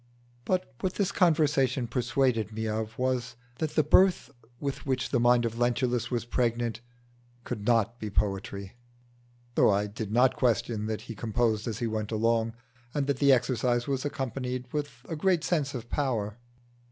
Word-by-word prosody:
But 185 -7 -1
what 185 - -2
this 200 -3 0
conversation 145 -7 +2
persuaded 125 -2 0
me 110 +1 -3
of 110 +1 -3
was, 125 -2 -1 0.2
that 155 -2 -2
the 155 - +4
birth 180 +1 +4 0.3
with 140 -1 -3
which 130 -2 -1
the 125 - +2
mind 120 0 +4
of 115 0 -3
Lentulus 120 0 +1
was 120 -2 -2
pregnant 120 -1 0 0.6
could 105 -2 -5
not 115 0 +2
be 105 - -4
poetry, 100 0 -2 0.8
though - - +5
I 100 0 +2
did 105 0 -5
not 125 +3 +4
question 115 -3 0
that 110 -1 -3
he 115 - -7
composed 110 0 0
as 110 -2 -2
he 120 - -2
went 110 -1 -2
along, 115 +1 +1 0.4
and 145 -2 +1
that 140 -2 0
the 140 0 +5
exercise 120 -1 +2
was 135 -2 -1
accompanied 130 -2 -3
with 150 -1 -1 0.2
a 160 - -3
great 175 +1 +2
sense 145 -6 0
of 120 -2 -6
power. 120 -6 -1
120 Hz, 165 wpm, -28 LUFS, 110-135 Hz, 0.8 s, though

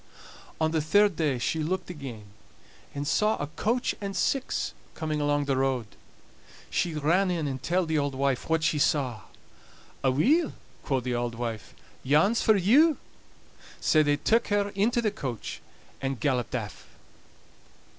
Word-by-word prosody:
On 160 0 +1
the 160 -1 +1
third 200 +5 +3
day 150 -5 0
she 160 +6 -1
looked 180 +4 -2
again, 135 -9 -8 0.7
and 145 0 -3
saw 215 +6 +2
a - - -2
coach 230 - -1
and 200 -1 -4
six 270 -2 0 0.2
coming 155 -1 -2
along 145 0 +1
the 140 -1 +1
road. 130 -3 0 0.9
She 170 -3 0
ran 170 +6 +2
in 165 -4 -1
and 130 -2 -4
telled 175 +5 0
the 160 -1 +1
auld 140 -1 -1
wife 135 0 -1
what 160 -1 +2
she 150 -1 +1
saw. 130 -7 +1 0.8
"Aweel," 245 - +3 0.3
quo' 135 -2 0
the 125 0 -3
auld 120 -1 -2
wife, 115 -2 -5 0.3
"yon's 160 - +3
for 220 - +4
you." 275 - +5 0.8
Sae 155 - +4
they 145 -1 +2
took 225 +10 +2
her 205 -1 +1
into 220 +5 +1
the 215 - +1
coach, 130 - -5 0.4
and 135 -1 -2
galloped 130 -5 0
aff. - - -6
155 Hz, 155 wpm, -27 LUFS, 135-195 Hz, 0.9 s, you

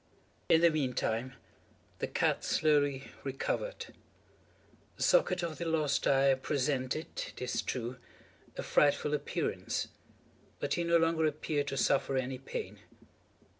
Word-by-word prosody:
In 165 - +6
the 170 -1 +6
meantime 130 -3 -1 0.6
the - - -1
cat - - +1
slowly 145 -3 +2
recovered. 140 - -3 1.0
The - - -2
socket - - +3
of 165 -2 -4
the 170 - -2
lost 155 -4 +1
eye 135 0 +5
presented, 135 +1 -1 0.2
it - - -11
is 125 0 -1
true, 125 0 -4 0.6
a - - -3
frightful 145 0 +3
appearance, 145 -1 -2 0.7
but - - -1
he 175 - 0
no 170 0 +4
longer 165 -1 +2
appeared 150 -1 -1
to 135 - -3
suffer 135 0 +2
any 130 0 -2
pain. 135 - -6
145 Hz, 130 wpm, -32 LUFS, 135-160 Hz, 1.0 s, In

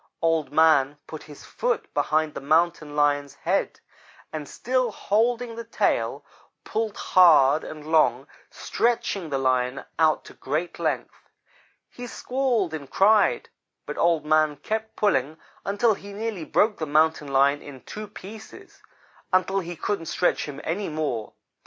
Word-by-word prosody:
"Old 165 -2 +1
man 150 -2 +4
put 155 - -8
his 145 -2 -13
foot 465 -3 -2
behind 155 -1 +1
the - - -6
Mountain 155 0 +1
lion's 145 -1 +1
head, - - -1 0.5
and, 150 -2 -5
still 255 -1 -1
holding 230 +4 0
the 230 - -6
tail, 230 - -1 0.4
pulled 220 -1 -3
hard 155 -5 +5
and 155 -1 -9
long, 140 -5 +3 0.2
stretching 225 -7 -1
the 140 - -1
Lion 130 0 0 0.2
out 155 -1 +3
to - - -12
great 155 +6 -3
length. - - -3 0.6
He 245 0 -9
squalled 245 -9 -1
and 140 -4 -6
cried, 210 +2 +3 0.4
but - - -5
Old 165 -3 +2
man 155 -1 +3
kept 220 +8 -4
pulling 160 -7 +1 0.3
until 205 +3 +2
he 200 0 -10
nearly 210 -5 -4
broke 210 +5 +2
the 155 - -3
Mountain 155 0 +2
lion 140 +1 +3
in 135 -3 -11
two 215 - -8
pieces 215 +2 -12 0.5
until 185 +1 +2
he 175 -1 -6
couldn't 165 -1 -3
stretch 180 - +1
him 140 -2 -7
any 190 +4 -2
more. 150 -8 -3
160 Hz, 145 wpm, -25 LUFS, 145-210 Hz, 0.6 s, hard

